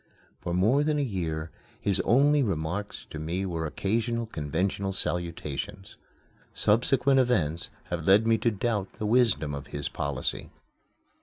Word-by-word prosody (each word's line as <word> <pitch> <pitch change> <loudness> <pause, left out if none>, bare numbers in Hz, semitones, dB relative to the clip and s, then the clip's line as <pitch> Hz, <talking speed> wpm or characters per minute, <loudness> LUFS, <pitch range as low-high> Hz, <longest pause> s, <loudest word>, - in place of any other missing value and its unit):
For 85 - -4
more 110 +11 +3
than 150 0 +1
a 145 - +1
year 80 - -3 0.3
his 100 -2 0
only 145 +8 +4
remarks 100 - -2
to 75 - -5
me 85 +5 -2
were 85 -3 -2
occasional 115 +7 -1
conventional 95 +2 -2
salutations. 90 +2 -2 0.6
Subsequent 130 +5 +3
events 90 - +1 0.2
have 85 -2 -2
led 100 +4 +6
me 115 -1 +3
to 115 - +2
doubt 105 -2 -2
the 105 - -5
wisdom 110 - +2
of 70 -1 -6
his 70 -1 -4
policy. 70 -2 -3
95 Hz, 140 wpm, -28 LUFS, 80-115 Hz, 0.6 s, led